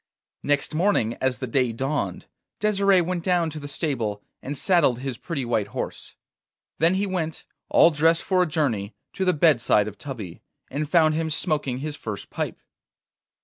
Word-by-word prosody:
Next 145 +1 0
morning 155 - +2
as 130 -1 +1
the 130 - -4
day 125 0 +1
dawned, 130 -5 -2 0.3
Desire 200 -3 +3
went 175 0 -2
down 175 -3 +1
to 155 - -6
the 145 - -7
stable 120 -9 -2 0.2
and 140 +2 -5
saddled 165 -8 +3
his 130 0 -4
pretty 150 -7 -3
white 110 -4 0
horse. - - -6 0.6
Then 165 +3 +4
he 200 +2 +1
went, 170 -5 -3 0.2
all 170 - +6
dressed 165 +2 +3
for 185 -1 +2
a 180 - +2
journey, 120 -10 -1 0.2
to 190 - -1
the 180 - +4
bedside 145 -9 +3
of 105 -1 -8
Tubby, 115 -11 -7 0.3
and 145 +2 -3
found 155 -2 +4
him 160 +1 -1
smoking 150 -4 -1
his 150 0 -4
first 105 -2 -6
pipe. - - -3
150 Hz, 170 wpm, -24 LUFS, 125-170 Hz, 0.6 s, all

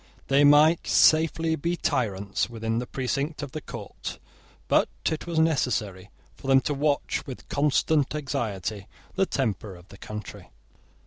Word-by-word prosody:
They 140 +1 +5
might 150 +3 +5
safely 160 0 +4
be 170 +4 -1
tyrants, 105 - -1
within 115 -1 -2
the 125 - -5
precinct 140 +5 -2
of 140 - -6
the 155 - -5
court: - - -7 0.5
but - - +3 0.2
it 160 +2 -4
was 170 -2 -3
necessary 110 - 0 0.3
for - - -11
them 135 0 +6
to 145 - -1
watch 145 0 0
with 130 - -8
constant 145 0 +1
anxiety 110 -8 -3 0.3
the 195 0 +1
temper 105 -6 -2
of 90 +1 -16
the 100 - -14
country. 105 -2 -8
135 Hz, 145 wpm, -26 LUFS, 110-155 Hz, 0.5 s, them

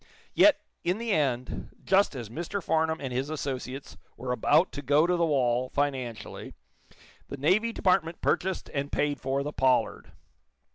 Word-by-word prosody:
Yet, 310 - +6 0.2
in 180 +3 0
the 230 0 -3
end, 130 -7 -1
just 195 -5 +3
as 120 -4 -5
Mr. 170 - -4
Farnum 160 0 +1
and 130 -3 -5
his 130 +3 -2
associates 135 -3 -5 0.2
were 125 +1 -4
about 150 +7 +3
to 145 - -6
go 145 +3 +3
to 180 +1 +2
the 170 -1 +2
wall, 125 -3 +1
financially, 130 -5 -3 0.7
the 140 - -7
Navy 190 +11 +2
Department 180 -5 +1
purchased 190 +1 0
and 140 0 -2
paid 145 -1 0
for 135 +1 -1
the 150 +1 -5
"Pollard." 130 -1 +1
145 Hz, 155 wpm, -28 LUFS, 130-170 Hz, 0.7 s, Yet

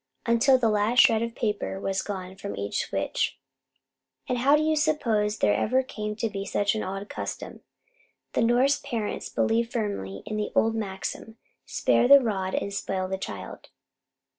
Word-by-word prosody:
Until 240 +3 +4
the 240 -3 +1
last 215 +3 +2
shred 220 -1 +4
of 230 0 -3
paper 210 -3 -2
was 195 -1 -1
gone 190 -2 -6
from 100 - -6
each 100 0 -2
switch. - - -1 0.9
And 250 - -1
how 275 +4 +5
do 300 - +2
you 315 0 +2
suppose 230 -9 +1
there 105 - +3
ever 255 - +2
came 210 -4 -5
to 225 +1 -1
be 200 -2 -4
such 200 0 0
an 215 - -2
odd 195 +2 -5
custom? - - -6 0.7
The - - +1
Norse 250 +5 +3
parents 220 -4 -4
believe 230 +1 +1
firmly 200 - -3
in 215 - -4
the 210 - -2
old 225 0 +3
maxim, 220 +1 -5 0.3
"Spare 245 - +2
the 280 +1 +9
rod 195 -6 -2
and 200 - -2
spoil 190 -1 -2
the 190 0 -3
child." - - -7
215 Hz, 170 wpm, -26 LUFS, 195-240 Hz, 0.9 s, the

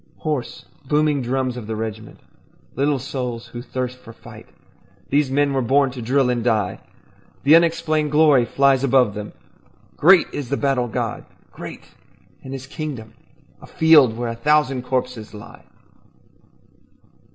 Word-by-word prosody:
Hoarse, 150 -6 -4 0.2
booming 150 -1 +1
drums 130 0 -2
of 115 -4 -8
the 110 - -3
regiment, 110 0 -7 0.5
Little 140 +2 +1
souls 125 -2 -5
who 120 - -7
thirst 125 0 -5
for 115 - -13
fight, - - -14 0.6
These 145 0 +2
men 140 +1 +1
were 135 - 0
born 135 +2 +2
to 125 -1 -8
drill 125 +2 +1
and 120 -2 -2
die. 110 -6 0 0.6
The 150 +3 +6
unexplained 165 -2 +2
glory 150 -4 +4
flies 135 +1 +2
above 130 -5 +3
them, 105 0 -7 0.7
Great 180 +2 +6
is 140 -4 -5
the 140 - -1
battle 135 -3 0
god, 115 - -4 0.3
great, - - -9 0.6
and 130 - -9
his 135 -1 -6
kingdom 135 -6 -7 0.5
A - - -13
field 150 -8 +4
where 120 -1 -3
a 115 - -4
thousand 135 0 +1
corpses 125 -4 -3
lie. 105 - -13
130 Hz, 145 wpm, -21 LUFS, 120-145 Hz, 0.7 s, The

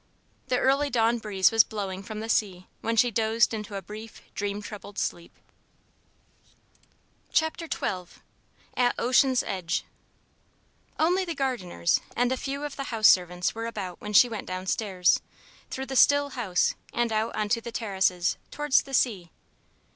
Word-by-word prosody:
The 250 - +1
early 275 +3 +2
dawn 235 -1 +2
breeze 195 -4 +2
was 225 -1 +6
blowing 195 -3 -5
from 215 +2 -7
the 225 - -5
sea 190 -5 0
when 230 0 -1
she 240 +2 +4
dozed 225 +2 +2
into 210 -2 -5
a 195 - -5
brief, 215 +4 -10
dream 200 +1 -3
troubled 210 -1 -9
sleep. 170 0 -3 2.0
XII 320 - +4 1.3
AT 245 -1 +2
OCEAN'S 255 +1 +3
EDGE 185 -4 -2 1.1
Only 360 +4 +2
the 340 -3 -4
gardeners 245 -11 0
and 245 +1 +2
a - - +2
few 280 +2 -4
of 295 -1 -5
the 275 - -3
house 225 -6 +4
servants 180 -1 +2
were 225 +1 -4
about 195 -6 -6
when 210 - -6
she 245 - +8
went 225 -3 -6
down 185 0 -4
stairs, 185 -3 +2 0.5
through 265 - -4
the 265 - -6
still 285 +2 +5
house 215 -9 0 0.2
and 235 -1 0
out 220 +1 -1
on 215 - -1
to 230 +1 +1
the 235 - -7
terraces, 190 -5 0
towards 295 -2 +2
the 270 -1 -4
sea. 200 -10 +1
220 Hz, 155 wpm, -27 LUFS, 195-250 Hz, 2.0 s, she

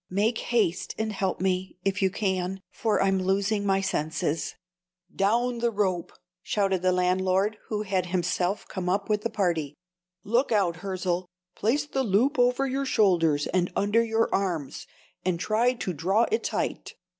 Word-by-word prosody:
Make 210 +5 +1
haste 205 -8 0
and 220 0 -2
help 190 -2 -1
me, 185 0 -1
if 195 0 0
you 190 - +4
can, 190 -1 -2
for 220 -2 0
I'm 195 -1 +2
losing 200 +2 0
my 195 0 +2
senses." 160 -3 -2 0.6
"Down 235 +5 +2
with 235 -1 -6
the 235 - +3
rope!" 190 -5 -1 0.3
shouted 195 -2 0
the 185 0 +3
landlord, 185 +3 +1
who 210 -1 -2
had 190 -3 -1
himself 180 +2 -1
come 180 -2 -3
up 195 +3 0
with 210 -1 +1
the 230 - -2
party. 170 -9 -1 0.5
"Look 235 +6 +1
out, 190 -6 +2
Hirzel! 185 -1 -2 0.3
Place 275 +8 +1
the 270 -2 -1
loop 250 +5 +2
over 250 +2 +3
your 270 +1 -1
shoulders 170 - +3
and 180 -1 +1
under 205 +3 +3
your 225 0 +1
arms, 175 -8 -2 0.4
and 180 -2 0
try 225 +6 +2
to 195 -7 -4
draw 190 +9 +2
it 445 - +1
tight. - - -3
195 Hz, 165 wpm, -27 LUFS, 180-220 Hz, 0.6 s, you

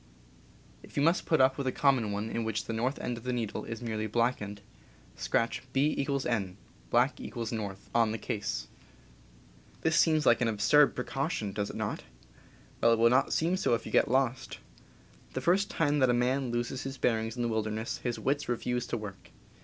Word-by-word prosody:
If - - -14
you 140 - +3
must 165 +3 +2
put 160 - +3
up 130 +1 +4
with 135 - -2
a - - +2
common 130 -7 +2
one 105 +2 -3
in 115 - -1
which 110 -1 -2
the 115 - -4
north 125 +5 -1
end 120 -1 -3
of - - -16
the 125 - -2
needle 115 -4 -3
is 115 +1 -6
merely 110 -2 -2
blackened, 105 -3 -1 0.5
scratch 115 0 0
B=N 135 -8 0 0.3
(Black - - +2
equals 115 -2 -5
North) 100 -4 -5
on 115 -2 +3
the 110 - -2
case. 105 -1 -3 1.1
This 160 -1 +2
seems 155 -3 +4
like 120 - +5
an 120 - +3
absurd 115 +7 +4
precaution, 125 - -2
does 105 0 -2
it - - -7
not? - - -3 0.8
Well, 115 - +5
it - - +2
will 115 +1 +5
not 130 +2 +3
seem 170 +3 +1
so 120 - +2
if 115 - -6
you - - -7
get - - +3
lost. 130 0 0 0.8
The 130 - -2
first 190 +7 +2
time 145 -2 +1
that 130 -2 +4
a 120 - +3
man 130 +2 +1
loses 120 +2 -2
his 135 0 -5
bearings 115 -2 0
in 120 - -2
the - - +1
wil 110 -1 0
derness 110 +1 -4
his 120 -2 -2
wits 140 0 -1
refuse 125 0 -1
to - - -2
work. 100 -3 -9
120 Hz, 200 wpm, -30 LUFS, 110-135 Hz, 1.1 s, like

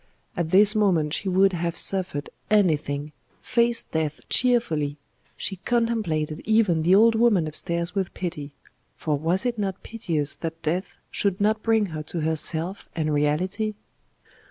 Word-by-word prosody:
At 170 -3 -2
this 205 +3 +6
moment 180 -9 +2
she 195 - -2
would 190 +1 +3
have 170 -1 -2
suffered 180 -7 +1 0.2
anything, 155 -8 +1 0.3
faced 235 0 +2
death 155 -2 -2
cheerfully 165 - +2 0.4
she 195 - -4
contemplated 205 -9 -1
even 215 -7 +2
the 175 +4 +4
old 225 +3 +6
woman 220 -7 +3
upstairs 170 +3 -2
with 195 -3 -2
pity 165 -6 -5 0.5
for 155 -2 -1
was 170 - 0
it 240 -3 -1
not 195 -2 -3
piteous 165 -10 -2
that 165 0 -6
death 175 +5 -2
should 195 -2 0
not 215 +1 +1
bring 225 -1 +2
her 155 - -4
to 160 +2 -5
herself 160 +4 -2
and 155 -2 -1
reality? 185 +9 0
180 Hz, 145 wpm, -24 LUFS, 155-210 Hz, 0.5 s, this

